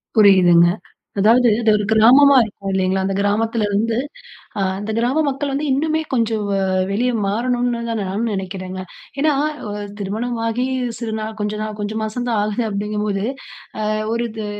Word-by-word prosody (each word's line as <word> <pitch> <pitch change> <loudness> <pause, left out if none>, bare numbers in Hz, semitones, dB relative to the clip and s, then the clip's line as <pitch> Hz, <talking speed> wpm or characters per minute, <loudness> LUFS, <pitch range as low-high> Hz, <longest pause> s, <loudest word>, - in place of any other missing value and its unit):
புரியுதுங்க. 185 -5 +6 0.5
அதாவது 235 +5 +5
அது 225 - +2
ஒரு 210 - -2
கிராமமா 260 +6 +6
இருக்கும். 200 -2 -7
இல்லேங்களா! 190 0 +1
அந்த 195 - -1
கிராமத்துல 215 +2 0
இருந்து 225 +3 0 0.6
அ - - 0 0.2
அந்த 205 +2 -4
கிராம 250 +7 +1
மக்கள் 280 +1 -2
வந்து 280 +2 -2
இன்னுமே 310 +4 +1
கொஞ்சம் 225 -3 0
வ 200 - 0 0.4
வெளிய 240 +5 +1
மாறணுன்தான் 235 +1 -1
நானும் 200 +4 -2
நினைக்குறேங்க. 190 -1 -5 0.4
ஏன்னா, 305 +2 +3 0.4
அ - - -4 0.3
திருமணம் 220 +5 -3
ஆகி 235 +3 -1 0.3
சிறு 230 -2 -4
நாள் 215 0 -5
கொஞ்ச 210 0 -2
நாள் 215 0 -5
கொஞ்சம் 215 +1 -3
மாசம் 245 +3 -3
தான் 225 -3 +1
ஆகுது 215 +3 -1
அப்படிங்கும்போது 210 -1 -2 0.7
அ - - +1 0.2
ஒரு 235 +1 -1
இது 215 -1 -6
220 Hz, 155 wpm, -19 LUFS, 200-240 Hz, 0.7 s, புரியுதுங்க